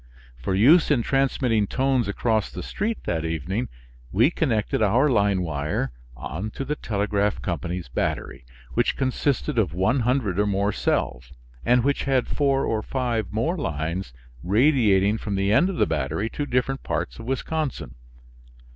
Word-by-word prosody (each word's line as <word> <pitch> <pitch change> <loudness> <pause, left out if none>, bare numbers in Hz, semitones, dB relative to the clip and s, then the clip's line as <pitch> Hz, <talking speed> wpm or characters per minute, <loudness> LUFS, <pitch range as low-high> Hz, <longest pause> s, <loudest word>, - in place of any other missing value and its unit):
For 65 +10 -2
use 145 - +6
in 130 -6 +3
transmitting 130 -6 +1
tones 130 -2 +1
across 110 +1 0
the 90 - -7
street 215 - -3
that 80 -2 -1
evening 85 - -2 0.4
we 120 - +4
connected 115 -11 0
our 120 +8 +3
line 100 -5 +2
wire 75 -2 -2 0.3
on 85 - -5
to 135 - -4
the 150 +3 -1
telegraph 105 -3 -1
company's 90 -2 -3
battery, - - -3 0.3
which - - +1
consisted 130 - 0
of 80 - 0
100 115 0 +1
or 105 - +2
more 100 +1 +1
cells, 65 -9 -2 0.3
and 125 0 +3
which 140 +1 0
had 135 -2 +1
four 140 -2 +1
or 110 -1 0
five 120 -3 -2
more 115 - 0
lines 80 - -3 0.3
radiating 105 - +3
from 105 -2 -3
the 100 +1 +1
end 175 +11 +4
of 195 - -3
the - - +4
battery 80 +8 -2
to 145 - -3
different 130 +2 0
parts - - -3
of - - -8
Wisconsin. 145 +2 -3
110 Hz, 155 wpm, -24 LUFS, 95-135 Hz, 0.4 s, use